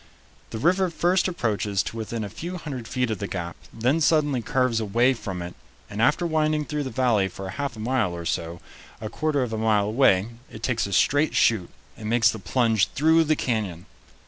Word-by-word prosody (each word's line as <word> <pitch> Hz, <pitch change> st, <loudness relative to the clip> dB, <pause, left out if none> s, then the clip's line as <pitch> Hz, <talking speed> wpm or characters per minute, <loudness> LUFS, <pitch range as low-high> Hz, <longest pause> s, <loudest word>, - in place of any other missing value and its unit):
The -, -, -5 dB
river 180 Hz, -, +2 dB
first 175 Hz, +2 st, +1 dB
approaches 105 Hz, -, -1 dB
to -, -, -6 dB
within 115 Hz, 0 st, -4 dB
a 100 Hz, -, -5 dB
few 175 Hz, -, -6 dB
hundred 135 Hz, -8 st, -6 dB
feet 125 Hz, -2 st, -1 dB
of 105 Hz, -, -3 dB
the 100 Hz, -, -3 dB
gap, 85 Hz, -3 st, -5 dB, 0.2 s
then 125 Hz, +8 st, 0 dB
suddenly 150 Hz, -5 st, +2 dB
curves 125 Hz, 0 st, +1 dB
away 120 Hz, +5 st, +2 dB
from 95 Hz, -7 st, -5 dB
it, 85 Hz, -, -7 dB, 0.4 s
and 105 Hz, +2 st, -3 dB
after 150 Hz, +8 st, +3 dB
winding 155 Hz, -2 st, +1 dB
through 150 Hz, -1 st, -3 dB
the -, -, -3 dB
valley 120 Hz, -7 st, +2 dB
for 95 Hz, +1 st, -8 dB
half 140 Hz, +4 st, -4 dB
a -, -, -10 dB
mile 115 Hz, -6 st, 0 dB
or 85 Hz, 0 st, -7 dB
so, 85 Hz, +1 st, -3 dB, 0.4 s
a 110 Hz, -, -5 dB
quarter 145 Hz, +2 st, 0 dB
of 115 Hz, -3 st, -4 dB
a 110 Hz, -, -2 dB
mile 110 Hz, -2 st, +2 dB
away, 105 Hz, -3 st, +3 dB, 0.2 s
it 110 Hz, -, -11 dB
takes 115 Hz, -4 st, 0 dB
a 100 Hz, -, -5 dB
straight 145 Hz, +9 st, +2 dB
shoot 105 Hz, -7 st, +3 dB, 0.3 s
and 105 Hz, -1 st, -6 dB
makes 115 Hz, 0 st, +4 dB
the 110 Hz, -, -7 dB
plunge 110 Hz, +2 st, +2 dB
through 160 Hz, +3 st, +4 dB
the 155 Hz, +1 st, +2 dB
canyon. 105 Hz, -, -2 dB
115 Hz, 205 wpm, -24 LUFS, 105-145 Hz, 0.4 s, makes